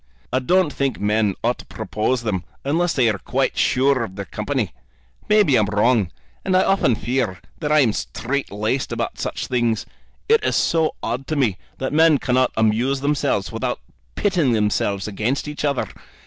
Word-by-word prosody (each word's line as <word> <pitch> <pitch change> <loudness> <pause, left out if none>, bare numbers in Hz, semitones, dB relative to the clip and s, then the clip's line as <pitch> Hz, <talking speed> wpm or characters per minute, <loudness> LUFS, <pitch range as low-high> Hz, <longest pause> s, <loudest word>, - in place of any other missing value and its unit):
"I 130 - +3
don't 175 +3 +2
think 135 -3 -1
men 105 -1 +1
ought - - +1
to - - -11
propose 115 +3 -2
them 95 -6 -1 0.2
unless 165 +5 +1
they 125 -4 +3
are 105 -3 0
quite - - -1
sure 130 -1 +2
of 95 -4 -7
their 100 0 -5
company. 105 - -2 0.6
Maybe 210 -10 +5
I'm 110 -4 +3
wrong, 105 -1 +2 0.3
and 185 -1 +2
I 185 - +4
often 195 - +2
feel 120 -7 -1 0.2
that 150 - -2
I 150 0 +6
am 115 -6 +3
strait 135 +7 -3
laced 110 +6 -2
about - - -3
such - - -3
things. 120 -3 0 0.4
It 450 0 +4
is - - +1
so 160 -2 +2
odd 130 +3 -3
to 155 - -1
me 115 - +1 0.2
that 130 - -3
men 160 -1 +5
cannot 130 -1 +1
amuse 115 +5 +2
themselves 145 +1 0
without - - -2 0.4
pitting 175 - +2
themselves 105 -2 0
against 110 +8 -2
each 150 0 -5
other. 140 -3 0
130 Hz, 175 wpm, -21 LUFS, 110-145 Hz, 0.6 s, I